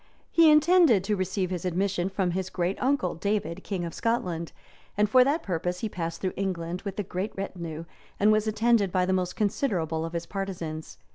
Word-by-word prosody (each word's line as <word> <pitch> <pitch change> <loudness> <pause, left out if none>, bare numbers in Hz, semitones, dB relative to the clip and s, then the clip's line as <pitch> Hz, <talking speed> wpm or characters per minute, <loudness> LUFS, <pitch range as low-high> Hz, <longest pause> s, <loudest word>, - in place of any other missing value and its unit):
] - - -34
He 330 -1 +6
intended 305 - +5
to 210 +2 0
receive 185 0 -1
his 180 -2 -3
admission 185 +1 0
from 190 -2 0
his 185 +1 -2
great 180 +1 -2
uncle, 260 -9 +1
David, 190 -1 -2
king 185 -4 -3
of 165 - -6
Scotland; 180 -8 -1 0.5
and 210 0 +4
for 255 +4 +6
that 290 +5 0
purpose 180 0 -2
he 220 - -2
passed 165 -3 -4
through 185 - -1
England 180 -2 -3
with 200 -2 -6
a - - 0
great 185 +2 -3
retinue, 170 -4 -5 0.3
and 210 +2 +5
was 215 0 +2
attended 215 -2 +2
by 185 -1 +2
the 190 - +1
most 180 -1 -1
considerable 185 - 0
of 165 0 -5
his 170 0 -3
partisans. 175 -5 -5
190 Hz, 200 wpm, -27 LUFS, 175-210 Hz, 0.5 s, He